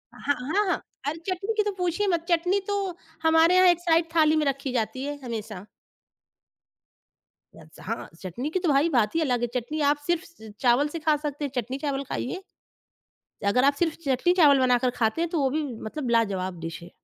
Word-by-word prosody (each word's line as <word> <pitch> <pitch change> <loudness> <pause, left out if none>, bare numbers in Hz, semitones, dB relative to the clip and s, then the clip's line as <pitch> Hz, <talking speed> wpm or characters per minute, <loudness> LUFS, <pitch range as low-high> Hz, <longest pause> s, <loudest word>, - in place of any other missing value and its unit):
ह - - -14
हाँ, 285 - +1 0.3
हाँ। 355 - 0 0.3
अरे! 300 +3 -2
चटनी 390 +4 -2
की 425 - +4
तो 415 - -1
पूछिए 360 +3 0
मत, 340 -3 0
चटनी 355 +3 +2
तो 410 - 0 0.5
हमारे 325 +2 +5
यहाँ 370 0 +6
एक 350 -1 +4
साइड 335 -1 +2
थाली 310 -1 +5
में 310 -1 +1
रखी 275 -1 -1
जाती 235 +2 -2
है 290 0 -5
हमेशा। 215 -5 -6 1.9
याद 155 - -15
से, - - -13
हाँ, 230 +3 -4
चटनी 195 - -4
की 370 - -1
तो 355 -3 0
भाई 285 +3 +3
बात 235 -6 +1
ही 330 - +2
अलग 250 -6 0
है, 240 - +1
चटनी 300 +6 -5
आप 295 - 0
सिर्फ़ 345 -1 0 0.2
च 220 -1 -10
चावल 250 +3 +4
से - - -2
खा 310 -1 +2
सकते 290 0 -3
हैं, 280 - -5
चटनी-चावल 270 +3 -2
खाइए। 370 +9 -3 1.1
अगर 250 - +3
आप 285 - +5
सिर्फ़ 330 -2 +1
चटनी-चावल 285 +1 +4
बनाकर 250 -1 +3
खाते 220 +8 +1
हैं, 340 - 0
तो 330 - -1
वो 270 - +2
भी 310 - 0 0.3
मतलब 270 0 -4
लाजवाब 190 -5 -1
डिश 165 +1 -6
है। 170 - -11
290 Hz, 200 wpm, -26 LUFS, 245-335 Hz, 1.9 s, यहाँ